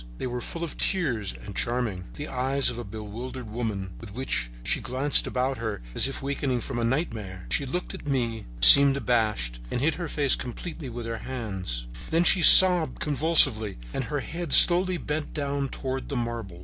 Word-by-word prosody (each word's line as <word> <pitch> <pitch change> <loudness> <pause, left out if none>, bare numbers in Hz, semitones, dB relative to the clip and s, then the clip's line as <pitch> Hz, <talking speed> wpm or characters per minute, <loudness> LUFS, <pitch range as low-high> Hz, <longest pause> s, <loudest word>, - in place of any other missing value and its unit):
They - - -6
were 125 -1 -5
full 170 +6 -7
of 165 - -6
tears 125 - 0
and 100 - -10
charming, 115 -7 -3
the 145 - -7
eyes 135 +1 +1
of 120 - -8
a - - -6
bewildered 115 +4 -9
woman, 105 -5 -5
with 100 - -11
which 65 - -2
she - - 0
glanced 130 +3 +1
about 130 +1 -3
her 110 -3 -5
as - - +3
if 135 - -7
awaking 135 -3 -3
from 125 -1 -6
a - - -2
nightmare. 115 - -4
She 140 - -1
looked 180 +7 -5
at - - -11
me, 120 -5 -3 0.2
seemed 140 -1 +9
abashed 105 - -1
and - - -3
hid 155 +5 0
her 170 - -4
face 145 -3 0
completely 150 +5 -8
in 120 -1 -7
her 115 0 -5
hands. 95 - -6 0.2
Then 165 +2 +1
she 175 +1 +3
sobbed 180 -1 +7
convulsively, 140 -8 +4 0.2
and 130 - -4
her 145 +1 -4
head 165 +1 -5
slowly 180 +1 +6
bent 150 -1 -5
down 140 -2 -3
toward 130 0 -6
the 140 - -4
marble. 115 -7 -6
130 Hz, 190 wpm, -25 LUFS, 110-145 Hz, 0.2 s, seemed